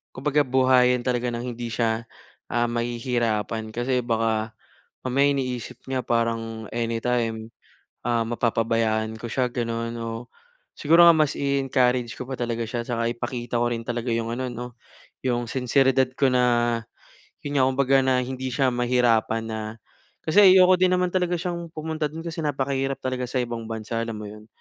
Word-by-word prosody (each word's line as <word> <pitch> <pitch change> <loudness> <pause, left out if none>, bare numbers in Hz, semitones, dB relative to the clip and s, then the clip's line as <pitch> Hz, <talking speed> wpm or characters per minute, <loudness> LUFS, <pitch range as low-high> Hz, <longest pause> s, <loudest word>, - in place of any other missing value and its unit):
kumbaga 150 +2 +1
buhayin 130 -2 +3
talaga 125 -1 0
ng 120 +1 -4
hindi 120 0 -5
siya, 115 0 -1 0.4
ah, 120 0 +1
mahihirapan 115 -2 -1
kasi 125 +2 0
baka 115 -2 0 0.5
mamaya 135 +2 +2
iniisip 125 -4 -4
niya 130 -1 -2
parang 115 -2 -1
anytime, 115 -1 -1 0.6
ah, 120 -1 +1
mapapabayaan 115 -1 0
ko 115 - -8
siya, 125 +1 0
gano'n 115 -1 -2
'no. 115 +1 -6 0.5
Siguro 165 +3 +6
nga 170 - +9
mas 155 -2 +2
i-encourage 130 -3 +1
ko 125 - -5
pa 135 - -6
talaga 120 -2 -2
siya 120 +1 -3
tsaka 115 -1 -2
ipakita 120 0 -3
ko 120 - +2
rin 115 - -3
talaga 120 0 -3
'yong 115 0 -2
ano 130 - -2
'no, 120 +1 -5 0.6
'yong 120 -1 0
sinseridad 130 0 +2
ko 135 - +4
na 120 -1 +3 0.7
yun 145 -1 -1
nga, 130 - +5
kumbaga 135 +1 +3
na 130 -1 +3
hindi 130 +1 -4
siya 135 -2 +2
mahirapan 120 -2 +2
na 110 0 -4 0.6
kasi 160 +5 +1 0.2
ayoko 185 -1 +6
din 185 0 +3
naman 180 0 +1
talaga 180 -1 0
siyang 175 0 -3
pumunta 155 0 -2
dun 160 +2 -6
kasi 165 -1 -6
napakahirap 135 -1 -1
talaga 130 -1 -2
sa 125 +1 -1
ibang 120 -2 -5
bansa, 110 0 -4
alam 115 - -4
mo 105 -1 -7
yun? 105 +1 -12
120 Hz, 160 wpm, -24 LUFS, 115-130 Hz, 0.7 s, nga